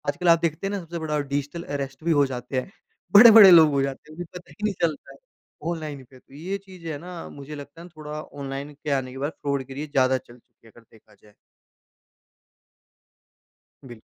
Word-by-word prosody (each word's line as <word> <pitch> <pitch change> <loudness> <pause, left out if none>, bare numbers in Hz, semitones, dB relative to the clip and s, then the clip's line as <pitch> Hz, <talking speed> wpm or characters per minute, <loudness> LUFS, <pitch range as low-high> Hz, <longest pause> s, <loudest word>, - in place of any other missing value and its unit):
आजकल 175 +5 -1
आप 165 -1 +6
देखते 165 +3 -1
हैं - - -3
ना, 200 - -2
सबसे 170 -1 -7
बड़ा 155 -2 -2
डिजिटल 145 +4 -3
अरेस्ट 135 0 -5
भी 170 - +1
हो 145 -3 +4
जाते 130 0 -4
हैं, 155 - -8 0.4
बड़े-बड़े 215 -2 +10
लोग 160 -3 +8
हो 140 -1 +1
जाते 135 +2 -5
हैं, - - -12
उन्हें 175 +2 -6
पता 180 - -10
ही 210 - -14
नहीं 210 -1 +1
चलता 160 -4 -2
है, - - -17 0.5
ऑनलाइन 155 -5 -6
पे 130 +1 -18
तो 135 - -24
ये 175 +7 -4
चीज़ें 170 -5 -7
ना 175 +1 -9
मुझे 145 +1 -9
लगता 145 +3 -11
है 175 - -11
थोड़ा 155 -2 -8
ऑनलाइन 140 0 -7
के 145 +1 -6
आने 130 -2 -1
के 130 - -10
बाद 150 - -2
फ्रॉड 140 -1 -1
गिरी 140 +3 -6
ज़्यादा 130 -2 +2
चल 120 -1 -15
चुकी 115 - -26
है - - -18
अगर 120 - -18
देखा 110 - -22
जाए। 105 - -20 2.5
बिल 120 -4 -12
145 Hz, 210 wpm, -24 LUFS, 135-170 Hz, 2.5 s, बड़े-बड़े